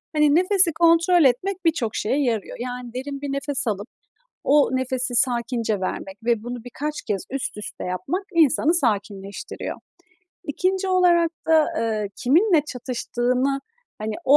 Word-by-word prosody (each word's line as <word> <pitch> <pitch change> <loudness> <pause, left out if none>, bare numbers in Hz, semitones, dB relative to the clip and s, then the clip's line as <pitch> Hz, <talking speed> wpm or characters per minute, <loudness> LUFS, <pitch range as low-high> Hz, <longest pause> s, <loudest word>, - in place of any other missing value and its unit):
Hani, 300 -1 +4
nefesi 365 -1 +4
kontrol 335 +1 +4
etmek 360 +9 +1
birçok 275 -9 +1
şeye 275 +7 0
yarıyor. 225 -6 -2
Yani, 245 -1 -6
derin 275 +2 -5
bir 285 -1 -3
nefes 275 -1 -2
alıp 205 0 -2 0.6
o 290 +1 +4
nefesi 255 -1 -2
sakince 235 -3 0
vermek 190 +1 -4
ve 230 -2 +1
bunu 240 0 -6
birkaç 295 +5 -5
kez 200 -3 -2
üst 270 -4 -3
üste 210 -2 -7
yapmak 185 - -3
insanı 320 0 +4
sakinleştiriyor. 205 - -2 0.7
2'nci 370 +5 -1
olarak 350 -2 +4 0.2
da, 320 -1 +5
ııı, 220 -2 -1
kiminle 330 - +3
çatıştığını, 250 +1 -1 0.4
hani, 215 0 -3
o 280 - +7
260 Hz, 140 wpm, -23 LUFS, 235-325 Hz, 0.7 s, o